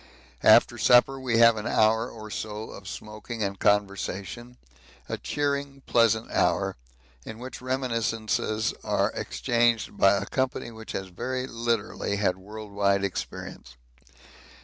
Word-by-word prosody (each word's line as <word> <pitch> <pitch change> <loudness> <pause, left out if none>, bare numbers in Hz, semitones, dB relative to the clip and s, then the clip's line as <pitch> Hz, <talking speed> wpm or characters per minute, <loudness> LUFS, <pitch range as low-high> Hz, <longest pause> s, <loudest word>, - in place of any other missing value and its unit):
After - - +6
supper 130 +2 +5
we 125 -3 0
have 115 -1 +6
an 105 +2 -4
hour 110 +2 +3
or 110 -2 -10
so 105 +1 -5
of 100 - -11
smoking 105 +2 -6
and 100 -1 -3
conversation 105 +4 -1 0.5
a - - -4
cheering, 140 -1 -2
pleasant 115 -1 +2
hour 95 +2 +1 0.5
in 110 - -8
which 125 +2 -8
reminiscences 115 -4 -1
are - - +1
exchanged 115 - 0
by 100 +1 +6
a 100 - -3
company 130 -1 -2
which 110 -1 -9
has 95 -1 -4
very 130 +8 -3
literally 115 -4 -2
had 100 -3 +1
world 105 +2 -9
wide 100 -1 +2
experience. 75 -8 -5
110 Hz, 130 wpm, -26 LUFS, 100-120 Hz, 0.5 s, After